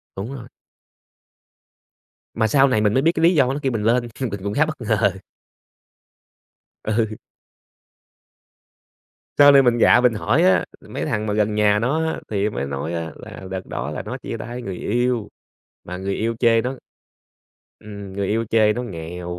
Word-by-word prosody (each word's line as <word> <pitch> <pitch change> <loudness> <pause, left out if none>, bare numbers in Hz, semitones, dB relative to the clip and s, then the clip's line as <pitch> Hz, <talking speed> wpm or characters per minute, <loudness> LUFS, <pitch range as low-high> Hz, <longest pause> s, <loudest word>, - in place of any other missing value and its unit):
Đúng 105 +7 -5
rồi. 120 -3 -9 1.9
Mà 110 - +1
sau 135 +5 +4
này 110 -5 +1
mình 105 0 +2
mới 130 - +3
biết 165 +4 +3
cái 165 -2 -2
lý 170 +2 +5
do 135 -3 +3
nó 140 - -3
kêu 135 - 0
mình 110 -3 -2
lên 120 +2 +2
mình 110 -7 -3
cũng 100 - -3
khá 155 +8 +3
bất 155 -4 -6
ngờ. 110 -4 +1 1.7
Ừ. 110 0 -1 2.2
Sau 145 0 +8
này 140 -1 +7
mình 120 -2 +3
gạ 120 +1 +5
mình 125 -2 +3
hỏi 120 +10 +1
á, 185 - +4 0.2
mấy - - -4
thằng 110 -8 -2
mà 105 - -1
gần 105 0 +1
nhà 105 -1 +3
nó 150 +8 0
á 160 - -3
thì 105 0 0
mới 70 - -4
nói 70 +4 -4
á 80 -1 -4
là 95 - -10
đợt 95 -1 -5
đó - - -4
là - - -4
nó - - -6
chia - - -6
tay 120 +1 -7
người 95 -6 -5
yêu 120 +2 -1 0.5
mà 90 +1 -7
người 95 +1 -3
yêu 115 +1 -1
chê 115 -1 +4
nó 125 +3 -3 1.0
ừm, 100 -2 -9
người 100 0 -2
yêu 115 +3 0
chê 110 -2 +4
nó 120 - -4
nghèo, 90 -3 -6
110 Hz, 185 wpm, -21 LUFS, 100-125 Hz, 2.2 s, Sau